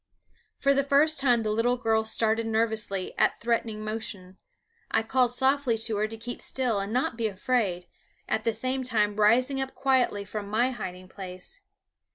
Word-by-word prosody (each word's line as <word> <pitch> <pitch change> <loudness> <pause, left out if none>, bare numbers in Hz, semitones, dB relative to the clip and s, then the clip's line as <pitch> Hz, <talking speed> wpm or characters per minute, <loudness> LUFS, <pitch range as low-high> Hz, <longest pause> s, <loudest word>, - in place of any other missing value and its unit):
For 275 0 +3
the 275 0 +2
first 285 +2 +3
time 245 -4 +3
the 215 - -1
little 235 +3 +1
girl 225 -2 +1
started 225 0 +1
nervously 220 -4 -1
at - - +2
threatening 225 -2 -1
motion, 200 -4 -5 0.5
I 225 - +2
called 250 +2 +2
softly 265 -1 +2
to 225 -1 +1
her 210 +1 +1
to 225 +1 -7
keep 240 +2 -6
still 245 -6 0
and 200 +1 -4
not 250 0 0
be 225 - +1
afraid, 195 -3 -1 0.4
at 220 - -1
the 230 - +2
same 255 +4 -1
time 215 -5 0
rising 250 +6 +3
up 265 0 -4
quietly 255 -7 +1
from 205 0 -6
my 240 +5 +2
hiding 185 -6 -7
place. 185 -1 -6
225 Hz, 175 wpm, -27 LUFS, 210-255 Hz, 0.5 s, For